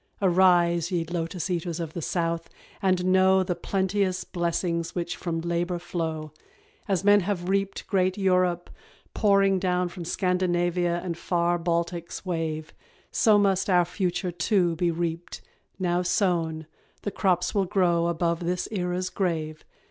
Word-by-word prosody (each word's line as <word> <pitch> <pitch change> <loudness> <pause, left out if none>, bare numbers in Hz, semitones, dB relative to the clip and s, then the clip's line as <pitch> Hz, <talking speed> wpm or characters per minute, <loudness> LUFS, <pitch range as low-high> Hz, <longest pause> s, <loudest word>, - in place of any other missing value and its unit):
Arise, 175 -2 +3
ye 170 -2 0
Lotus 170 +1 -3
eaters 175 -2 -2
of 165 -2 -5
the 170 - -4
South, 165 0 -2 0.3
and 185 -2 +1
know 190 0 +4
The 180 - -1
plenteous 190 0 -1
blessings 170 -1 -2
which 175 0 -2
from 165 -2 -3
labour 170 +1 -1
flow. 160 -3 -4 0.6
As 190 -2 0
men 205 0 +6
have 180 -2 -2
reaped 195 0 -1
great 185 -2 +1
Europe 180 -3 +1 0.4
pouring 195 -2 +3
down 180 -1 0
From 175 0 -8
Scandinavia 175 -1 0
and 175 -2 -3
far 175 0 0
Baltic's 170 +1 -2
wave, 160 -3 -3 0.4
So 215 -3 +4
must 195 -1 +2
our 180 -2 +4
future 180 0 -2
too 175 0 +1
be 175 +1 +1
reaped 170 0 -3 0.4
now 180 -1 0
sown, 170 -4 0 0.4
The 205 - -2
crops 180 -3 +1
will 200 -2 +2
grow 175 -3 +2
above 170 0 0
this 180 +1 -2
era's 180 -2 -2
grave. 160 -5 -2
175 Hz, 140 wpm, -26 LUFS, 170-185 Hz, 0.6 s, men